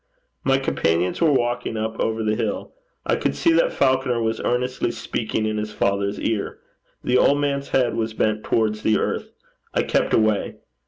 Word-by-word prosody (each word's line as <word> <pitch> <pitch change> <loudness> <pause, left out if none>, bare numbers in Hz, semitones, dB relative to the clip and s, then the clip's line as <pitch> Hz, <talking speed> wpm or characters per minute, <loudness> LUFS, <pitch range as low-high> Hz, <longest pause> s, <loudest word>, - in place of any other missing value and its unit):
My 135 0 +3
companions 90 - 0
were 165 -3 +5
walking 120 -3 0
up 110 +1 -3
over 110 0 0
the 110 0 +1
hill. 120 - -3 0.3
I - - +2
could - - -1
see 335 - +3
that - - +3
Falconer 130 -2 +1
was 110 0 -1
earnestly 125 0 0
speaking 110 -1 -2
in 110 0 -1
his 105 0 -3
father's 100 0 0
ear. 110 -3 -2 0.5
The 125 0 +3
old 145 - +4
man's 140 -1 -1
head 125 -3 +2
was 110 -1 -2
bent 110 -1 0
towards 110 -1 0
the 110 -1 +3
earth. - - -2 0.5
I - - +3
kept - - +1
away. 110 -2 +1
115 Hz, 175 wpm, -22 LUFS, 110-130 Hz, 0.5 s, were